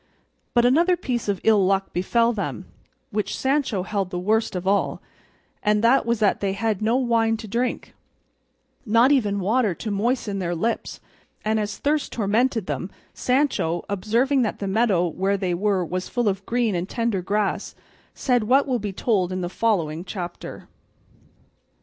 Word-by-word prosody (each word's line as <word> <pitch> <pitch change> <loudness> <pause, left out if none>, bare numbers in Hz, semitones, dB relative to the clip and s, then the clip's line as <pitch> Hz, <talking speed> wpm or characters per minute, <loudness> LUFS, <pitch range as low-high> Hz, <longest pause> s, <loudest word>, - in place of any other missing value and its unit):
But 240 0 +5
another 340 +8 +4
piece 245 -9 -3
of 200 -2 0
ill 215 -3 +4
luck 195 +1 +1
befell 230 +6 +2
them, 205 - -4 0.5
which 210 0 -2
Sancho 265 -8 0
held 195 -2 -2
the 180 - -4
worst 215 +4 0
of 180 0 -3
all, 200 +1 +1 0.6
and 210 0 +2
that 235 +1 +4
was 235 0 +2
that 210 -2 +2
they 195 -1 -1
had 215 0 -1
no 225 +3 +2
wine 230 -3 +2
to 220 - -8
drink, 240 +4 -2 0.9
nor 230 +3 +4
even 210 -8 +2
water 210 0 +1
to 215 - -5
moisten 210 -1 -1
their 175 -2 -2
lips; 225 +7 -2 0.4
and 220 0 +1
as 210 0 -3
thirst 295 +1 0
tormented 225 +1 +1
them, 185 - -3 0.2
Sancho, 250 - 0
observing 230 +8 +1
that 220 - -1
the 200 - -4
meadow 195 -4 +2
where 195 +4 0
they 185 -2 -1
were 190 0 +1
was 185 +2 -4
full 240 -2 0
of 195 -1 -1
green 235 -3 +1
and 180 +2 -2
tender 230 -5 -1
grass, 205 +2 -1 0.4
said 245 -5 +1
what 270 +5 +4
will 255 -3 0
be 205 -1 -4
told 190 -2 0
in 185 0 -2
the 175 - -3
following 175 -7 0
chapter. 180 -2 -7
210 Hz, 170 wpm, -23 LUFS, 190-235 Hz, 0.9 s, But